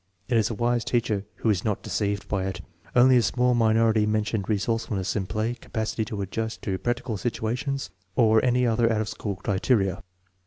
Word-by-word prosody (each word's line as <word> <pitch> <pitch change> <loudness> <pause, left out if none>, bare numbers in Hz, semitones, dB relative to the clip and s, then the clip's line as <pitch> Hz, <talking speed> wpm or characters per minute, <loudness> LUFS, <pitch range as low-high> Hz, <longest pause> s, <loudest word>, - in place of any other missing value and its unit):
It 125 - 0
is 110 -2 +3
a 115 - -3
wise 120 +2 +1
teacher 110 -4 0
who 110 - +1
is 95 -4 -1
not 105 -3 -1
deceived 100 -1 -2
by 95 -2 -1
it. 90 -2 -4 0.3
Only 125 +1 +6
a - - +5
small 125 +1 +2
minority 110 -2 +3
mentioned 105 -1 -1
resourcefulness 105 -2 -1
in 95 -3 -1
play, 110 +3 -1
capacity 110 -2 -3
to 105 -2 -4
adjust 110 +4 -4
to 95 -2 -2
practical 120 -2 -2
situations, 125 +7 -2 0.2
or 110 -2 +4
any 125 0 +3
other 115 0 +2
out 110 -1 +1
of 110 - -3
school 100 -3 -4
criteria. 95 0 0
110 Hz, 185 wpm, -26 LUFS, 100-120 Hz, 0.3 s, Only